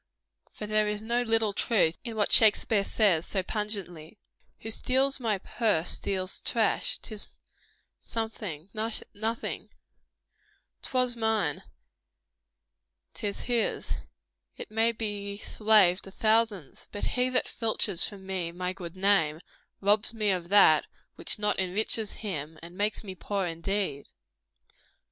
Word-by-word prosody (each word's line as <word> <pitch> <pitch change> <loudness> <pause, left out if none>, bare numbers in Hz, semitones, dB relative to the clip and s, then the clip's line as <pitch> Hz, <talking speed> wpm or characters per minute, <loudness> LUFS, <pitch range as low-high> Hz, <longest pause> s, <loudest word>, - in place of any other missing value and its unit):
For 210 - -7
there 215 0 +2
is 210 0 -3
no 235 +2 +1
little 225 -3 +2
truth 195 -6 +2
in 230 -2 -5
what 210 -1 +1
Shakspeare 215 -1 +5
says 195 -7 +3
so 190 -2 -1
pungently 200 -4 -3 0.4
"Who 225 - -5
steals 270 +4 +1
my 220 -5 0
purse, 190 -4 0
steals 190 -1 -1
trash; - - +1
'tis 215 -3 -4 0.7
something, 205 -7 -5
nothing; 220 0 -3 1.1
'Twas 255 -2 0
mine, 220 -10 0 1.5
't - - -4
is 200 - -4
his, 235 -3 -1 0.6
it - - -8
may 225 +2 +3
be 205 -3 -4
slave 210 -4 +4
to - - -11
thousands: 215 -5 0
But 205 - -3
he 250 0 +1
that 255 - +1
filches 215 -5 -1
from 195 -2 -11
me 185 -3 -3
my 180 +1 -3
good 175 -2 -8
name, 185 -6 +3 0.4
Robs 210 +3 +2
me 210 -2 +1
of 175 -2 -2
that 190 -6 +6 0.3
which - - -3
not 210 -1 0
enriches 205 +3 0
him, 155 -5 -4
And 170 +1 -10
makes 210 +3 -1
me 195 -3 -7
poor 195 +1 -2
indeed." 170 -3 -2
205 Hz, 130 wpm, -28 LUFS, 185-220 Hz, 1.5 s, that